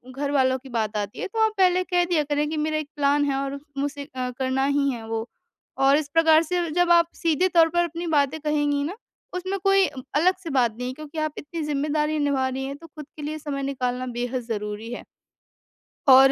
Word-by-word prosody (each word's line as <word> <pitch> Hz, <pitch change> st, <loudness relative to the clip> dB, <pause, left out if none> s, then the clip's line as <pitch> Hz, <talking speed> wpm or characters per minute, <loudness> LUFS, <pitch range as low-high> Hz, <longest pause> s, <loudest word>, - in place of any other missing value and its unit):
घरवालों 270 Hz, -2 st, +1 dB
की 265 Hz, +1 st, -13 dB
बात 220 Hz, -3 st, -2 dB
आती 205 Hz, 0 st, -4 dB
है -, -, -2 dB
तो 445 Hz, +4 st, -5 dB
आप 440 Hz, -, +1 dB
पहले 365 Hz, -1 st, +4 dB
कह 355 Hz, -1 st, +1 dB
दिया 340 Hz, -3 st, +1 dB
करें 295 Hz, +1 st, -1 dB
कि 315 Hz, -, -3 dB
मेरा 310 Hz, +1 st, 0 dB
एक 310 Hz, -1 st, -3 dB
प्लान 290 Hz, 0 st, +2 dB
है 280 Hz, -1 st, 0 dB
और 275 Hz, 0 st, -4 dB, 0.2 s
मुझे 285 Hz, +1 st, -2 dB
अ, 255 Hz, -1 st, -2 dB
करना 265 Hz, 0 st, +1 dB
ही 280 Hz, 0 st, +2 dB
है 230 Hz, -3 st, -7 dB
वो 225 Hz, 0 st, -3 dB, 0.6 s
और 275 Hz, +1 st, +6 dB
इस 305 Hz, -2 st, -2 dB
प्रकार 325 Hz, -1 st, +6 dB
से 345 Hz, 0 st, -1 dB
जब 355 Hz, +2 st, +2 dB
आप 340 Hz, -1 st, +5 dB
सीधे 335 Hz, +2 st, +3 dB
तौर 330 Hz, -2 st, +5 dB
पर 345 Hz, +1 st, +2 dB
अपनी 340 Hz, +1 st, -5 dB
बातें 285 Hz, +2 st, +1 dB
कहेंगी 290 Hz, -1 st, +1 dB
ना, 330 Hz, +7 st, -4 dB, 0.4 s
उसमें 375 Hz, +2 st, -3 dB
कोई 390 Hz, -1 st, +5 dB, 0.3 s
अलग 360 Hz, +5 st, +4 dB
से 335 Hz, -, -5 dB
बात 245 Hz, -5 st, +2 dB
नहीं 250 Hz, +1 st, -4 dB
है 255 Hz, -, -3 dB
क्योंकि 305 Hz, +2 st, -10 dB
आप 310 Hz, -1 st, -1 dB
इतनी 325 Hz, +3 st, -6 dB
ज़िम्मेदारी 300 Hz, +1 st, 0 dB
निभा 280 Hz, -2 st, +1 dB
रही 265 Hz, +1 st, -3 dB
हैं, 275 Hz, +1 st, -5 dB
तो 330 Hz, -, -13 dB
खुद 300 Hz, -1 st, -10 dB
के -, -, -7 dB
लिए 305 Hz, +1 st, -3 dB
समय 285 Hz, -2 st, -4 dB
निकालना 255 Hz, -2 st, -2 dB
बेहद 245 Hz, +1 st, -2 dB
ज़रूरी 210 Hz, 0 st, -4 dB
है। -, -, -6 dB, 1.1 s
और 265 Hz, +1 st, +9 dB
290 Hz, 220 wpm, -24 LUFS, 265-325 Hz, 1.1 s, और